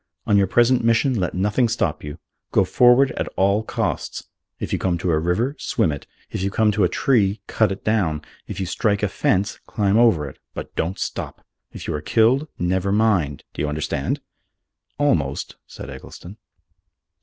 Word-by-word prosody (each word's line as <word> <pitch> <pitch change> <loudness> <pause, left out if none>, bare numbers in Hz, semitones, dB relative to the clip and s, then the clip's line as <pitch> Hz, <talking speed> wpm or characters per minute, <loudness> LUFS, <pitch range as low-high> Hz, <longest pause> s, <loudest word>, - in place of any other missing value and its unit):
On 105 - +3
your 100 -1 +4
present 120 +4 +3
mission 115 +4 +3
let 95 -7 -1
nothing 105 +6 +1
stop 115 - -1
you. 75 0 -7 0.3
Go - - +4
forward 125 +2 +5
at - - -3
all 100 +2 +3
costs. 110 - -3 0.3
If - - -4
you - - 0
come 90 -2 0
to 90 0 -1
a 80 - +2
river, 95 - 0
swim 105 -9 +1
it. 70 - -7 0.2
If - - -3
you 100 - 0
come 105 +2 +2
to 105 -1 +1
a 90 - +3
tree, 105 -3 +2
cut 110 -3 +1
it 95 - -6
down. 90 -9 0 0.2
If 100 - -6
you 95 - -1
strike 100 +3 0
a - - +3
fence, 100 +1 0
climb 105 0 +1
over 95 -12 +4
it. 65 - -11 0.2
But - - -7
don't 90 +4 -1
stop! - - -5 0.3
If - - -8
you - - -1
are 75 - -3
killed, 120 - +3
never 95 +2 0
mind. 100 - +1
Do - - -4
you 75 - 0
understand?" 75 -2 -2 0.8
"Almost," 80 - 0
said - - -9
Eggleston. 95 +5 -11
100 Hz, 185 wpm, -22 LUFS, 90-115 Hz, 0.8 s, forward